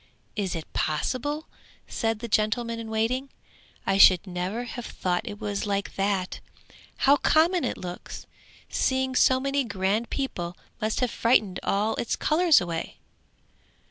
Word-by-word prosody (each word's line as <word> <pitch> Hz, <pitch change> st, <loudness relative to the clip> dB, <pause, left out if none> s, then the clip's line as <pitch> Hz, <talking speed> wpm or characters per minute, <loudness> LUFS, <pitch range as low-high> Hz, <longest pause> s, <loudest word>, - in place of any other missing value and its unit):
'Is 195 Hz, -4 st, -2 dB
it 160 Hz, -2 st, -7 dB
possible?' 275 Hz, -, -1 dB, 0.4 s
said 225 Hz, -1 st, -1 dB
the 235 Hz, -, -4 dB
gentleman 230 Hz, +2 st, 0 dB
in 225 Hz, -1 st, -6 dB
waiting. 235 Hz, +5 st, 0 dB, 0.6 s
'I 195 Hz, 0 st, +1 dB
should 185 Hz, -1 st, +7 dB
never 185 Hz, +5 st, -3 dB
have 245 Hz, 0 st, -6 dB
thought 185 Hz, +5 st, -2 dB
it 205 Hz, 0 st, -8 dB
was 205 Hz, -1 st, -3 dB
like 200 Hz, -1 st, -1 dB
that. 195 Hz, -2 st, -1 dB, 0.7 s
How 280 Hz, +1 st, +6 dB
common 335 Hz, +4 st, +3 dB
it -, -, -2 dB
looks! 180 Hz, -1 st, -7 dB, 0.4 s
Seeing 260 Hz, 0 st, 0 dB
so 260 Hz, 0 st, +4 dB
many 275 Hz, +1 st, 0 dB
grand 205 Hz, +1 st, -1 dB
people 175 Hz, -11 st, -3 dB, 0.2 s
must 215 Hz, +3 st, 0 dB
have 250 Hz, -, +1 dB
frightened 215 Hz, -5 st, +2 dB
all 210 Hz, +3 st, +1 dB
its 235 Hz, -, -1 dB
colours 325 Hz, -1 st, +4 dB
away.' 170 Hz, -2 st, -4 dB
220 Hz, 140 wpm, -26 LUFS, 195-260 Hz, 0.7 s, should